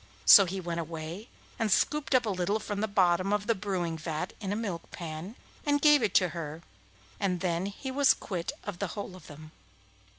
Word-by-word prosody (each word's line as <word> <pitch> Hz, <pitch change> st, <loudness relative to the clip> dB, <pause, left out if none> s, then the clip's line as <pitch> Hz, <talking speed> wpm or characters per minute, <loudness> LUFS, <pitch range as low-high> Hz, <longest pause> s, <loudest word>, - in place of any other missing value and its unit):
So 200 Hz, -, +10 dB
he 190 Hz, +2 st, -4 dB
went 170 Hz, -2 st, -3 dB
away 165 Hz, -, -6 dB, 0.3 s
and 225 Hz, -3 st, 0 dB
scooped 300 Hz, +6 st, +2 dB
up 250 Hz, -, +4 dB
a -, -, -1 dB
little 190 Hz, +3 st, 0 dB
from 205 Hz, -1 st, -4 dB
the 220 Hz, -, +1 dB
bottom 185 Hz, -1 st, +2 dB
of 205 Hz, 0 st, 0 dB
the 230 Hz, -, +3 dB
brewing 185 Hz, -5 st, -3 dB
vat 155 Hz, +3 st, -4 dB
in 195 Hz, -2 st, -3 dB
a -, -, 0 dB
milk 200 Hz, -7 st, -4 dB
pan, 170 Hz, +5 st, -7 dB, 0.3 s
and 290 Hz, -1 st, +2 dB
gave 295 Hz, -1 st, +6 dB
it 210 Hz, -4 st, 0 dB
to 180 Hz, -2 st, +5 dB
her, 160 Hz, 0 st, -6 dB, 0.6 s
and 185 Hz, -3 st, 0 dB
then 175 Hz, +1 st, -1 dB
he 230 Hz, +6 st, -6 dB
was 280 Hz, +1 st, +4 dB
quit 175 Hz, -4 st, -4 dB
of 200 Hz, -4 st, -6 dB
the 200 Hz, -, -1 dB
whole 200 Hz, -2 st, -5 dB
of 180 Hz, -3 st, -14 dB
them. 155 Hz, +1 st, -12 dB
190 Hz, 205 wpm, -29 LUFS, 170-210 Hz, 0.6 s, So